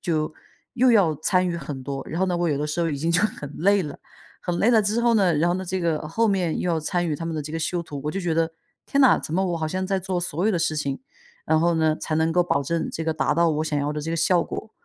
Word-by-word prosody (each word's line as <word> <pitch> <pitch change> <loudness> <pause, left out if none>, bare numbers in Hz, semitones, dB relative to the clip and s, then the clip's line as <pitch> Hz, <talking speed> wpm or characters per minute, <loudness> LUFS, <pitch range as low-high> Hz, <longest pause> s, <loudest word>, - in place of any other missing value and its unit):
就 155 -3 -1 0.4
又 250 0 +4
要 195 -8 +4
参 180 +4 +2
与 170 - -2
很 145 -5 -6
多。 135 0 -5
然 165 +3 -3
后 190 - +3
呢， 180 -1 0
我 175 0 0
有 145 - 0
的 150 - -1
时 150 +3 -2
候 165 - +1
已 145 - -2
经 160 +4 -1
就 170 - +3
很 150 -9 -3
累 200 +3 +3
了， 145 -3 -7 0.4
很 175 -1 -2
累 230 - +4
了 225 - +5
之 210 +3 0
后 235 -1 +3
呢， 190 -6 +3
然 165 +4 +2
后 - - +1
呢， 185 +1 -3
这 185 +1 -2
个 165 -3 0
后 225 +7 +1
面 180 -5 0
又 180 - 0
要 165 - +1
参 175 +2 -1
与 150 - -1
他 165 - -5
们 165 - -3
的 155 - -3
这 150 - -8
个 165 - -2
修 170 +2 -1
图， 145 -4 -7
我 150 - -1
就 195 - -3
觉 175 -2 -1
得： 165 0 +1 0.3
“天 280 - +1
呐， 265 - +6
怎 155 - -4
么 190 - +2
我 170 - -1
好 160 - -2
像 185 +4 -2
在 195 0 0
做 185 -1 -2
所 175 +2 -1
有 220 - +3
的 175 - +1
事 160 -1 0
情， 140 - -2 0.4
然 160 0 +2
后 170 +1 +2
呢， 160 -1 +2
才 155 - -2
能 160 +1 +2
够 180 +1 +4
保 140 -5 +1
证 165 +4 -2
这 165 - -3
个 160 - 0
达 155 - 0
到 170 0 +3
我 155 0 -1
想 155 -1 -1
要 145 +1 -1
的 150 - -4
这 160 +2 -4
个 - - -1
效 170 +1 +3
果。” 220 - -7
170 Hz, 335 characters per minute, -24 LUFS, 155-185 Hz, 0.4 s, 呐